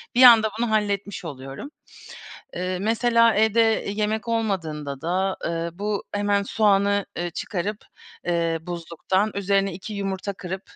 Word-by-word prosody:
Bir 250 - +6
anda 225 -3 +9
bunu 235 -1 0
halletmiş 205 -3 -1
oluyorum. 135 - -7 0.9
Eee, 185 0 -2
mesela 230 +2 +3
evde 220 +1 +3 0.3
yemek 215 +2 -1
olmadığında 160 -11 -2
da, 185 +4 0
eee, 170 0 -2
bu 205 0 -2
hemen 205 0 +1
soğanı, 200 -1 +2
eee, 175 0 -2
çıkarıp, 200 +4 -4 0.4
eee, 170 -1 +1
buzluktan 175 +4 -1
üzerine 195 0 +1
2 195 +5 -7
yumurta 195 0 -3
kırıp, 190 +1 -6
200 Hz, 130 wpm, -24 LUFS, 175-215 Hz, 0.9 s, anda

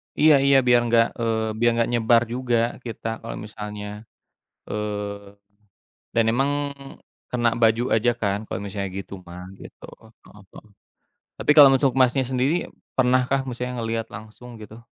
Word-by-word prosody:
Iya 155 -1 +6
iya, 140 0 +5
biar 120 0 +6
nggak 115 0 +4
eee, 110 -1 -1
biar 120 0 +4
nggak 115 0 +1
nyebar 115 0 +4
juga 125 -1 0 0.3
kita 115 -1 -6
kalau 115 - -7
misalnya 105 -1 -7 0.8
eee, 105 -1 -5 0.8
dan 115 - +4
emang 135 +4 +1 0.8
kena 120 -1 +2
baju 115 +1 +3
aja 120 +2 +2
kan 100 -1 0
kalau - - -4
misalnya 100 -1 -4
gitu 100 - -9
mah 90 +1 -9 0.2
gitu. - - -14 0.4
Heeh 105 -1 -17
heeh. 110 - -14 0.7
Tapi - - +2
kalau 145 -2 +10
untuk, 135 0 +2
Mas-nya 130 +1 +3
sendiri 130 +4 +1 0.4
pernah 130 0 +3
kah 135 0 +1
maksudnya 125 -1 -5
ngelihat 115 -1 -3
langsung 110 +4 -12
gitu? 110 +2 -12
115 Hz, 150 wpm, -23 LUFS, 105-125 Hz, 0.8 s, kalau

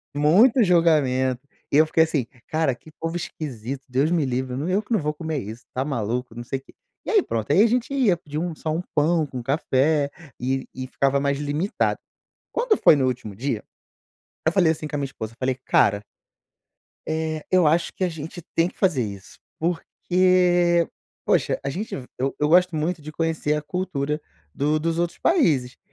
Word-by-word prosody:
Muito 210 - +5
julgamento, 140 -8 +3 0.3
e - - +4
eu 155 - +7
fiquei 160 +1 +4
assim: 145 -7 -1 0.2
"Cara, 155 -5 +1
que 155 - -17
povo 165 +1 -2
esquisito, 135 -5 -5
Deus 135 +6 +1
me 165 -4 +2
livre. 130 0 -2
Nã 145 +7 -2
eu 195 +3 +2
que 235 - -4
não 215 - +3
vou 150 0 -1
comer 160 -1 -3
isso, 110 +3 -8
tá 130 - -1
maluco, 125 -3 -3
não 120 - -6
sei 135 +2 -3
quê". 135 - -20 0.3
E - - -4
aí, 425 -3 +5
pronto. 110 - -3
E - - +5
aí 205 - +7
a - - +5
gente 245 +3 0
ia, 250 -10 +3
pedia 150 -3 -6
um 170 -1 -3
só 155 - -3
um 165 +3 -1
pão 155 +2 +3
com 130 -3 -6
café 140 +2 +1 0.3
e 130 +1 -1
e 130 - -5
ficava 140 +1 +1
mais 140 0 0
limitado. 150 +7 -1 0.5
Quando 475 -2 +2
foi 155 - +6
no 135 - +1
último 115 -5 -3
dia, 120 -2 -2 0.8
eu 160 - +4
falei 175 -3 +4
assim, 155 0 -6
com 150 - -5
a - - -2
minha 140 - -1
esposa, 115 -5 -7
eu 115 - -24
falei: 130 0 0
"Cara" 100 0 +3 1.1
"eh, 155 0 -2
eu 185 -3 +5
acho 165 +3 +2
que - - -3
a 180 - +2
gente 165 +2 -7
tem 165 +1 +3
que - - -22
fazer 170 -10 +2
isso 100 -2 -8 0.2
porque, 175 0 +2 0.4
poxa" - - +2
a 140 - -2
gente 195 +10 -4
ve 130 - -7
eu 135 +2 -1
eu 150 - +2
gosto 180 0 +4
muito 155 +1 -1
de 155 - -8
conhecer 160 -2 0
a 150 - -2
cultura 150 -3 -2 0.3
do 150 +2 +1
dos 165 +1 -1
outros 175 0 -1
países 150 - +2
150 Hz, 200 wpm, -24 LUFS, 135-175 Hz, 1.1 s, eu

